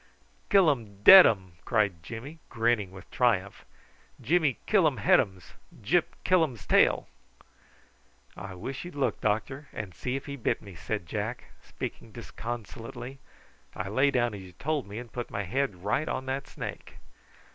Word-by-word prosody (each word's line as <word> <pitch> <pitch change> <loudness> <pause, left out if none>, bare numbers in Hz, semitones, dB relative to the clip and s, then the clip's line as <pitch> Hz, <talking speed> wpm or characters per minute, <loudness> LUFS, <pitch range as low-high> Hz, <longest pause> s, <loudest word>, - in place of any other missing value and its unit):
"Killum 120 - +2
dead 190 - +11
um!" 95 -5 -2
cried 105 -7 +1
Jimmy, 120 - -8
grinning 115 -4 +1
with 95 -1 -13
triumph. 105 -6 0 0.5
"Jimmy 150 +2 +2
killum 160 - +3
headums; 95 -3 +2 0.3
Gyp 155 - +2 0.2
killums 160 - +2
tail." - - +3 1.3
"I 95 0 -8
wish 125 +9 -6
you'd 175 -2 -9
look, 140 -2 -1
doctor, 135 +7 -1
and 100 -4 -6
see 125 +10 -3
if 135 - -5
he 140 -1 -6
bit 120 - 0
me," 100 -2 -12
said 90 +3 -4
Jack, 110 +6 -5
speaking - - -7
disconsolately. 120 +3 -7 0.6
"I 95 +1 -4
lay 130 +7 +3
down 120 -4 +1
as 100 - -7
you 90 -1 -12
told 145 - -2
me, 100 +2 -8
and 120 -1 -8
put 120 -1 -4
my 100 - -3
head 100 -3 -2
right 120 +9 0
on 130 - -3
that 135 +1 -3
snake." - - -8
115 Hz, 150 wpm, -28 LUFS, 100-140 Hz, 1.3 s, dead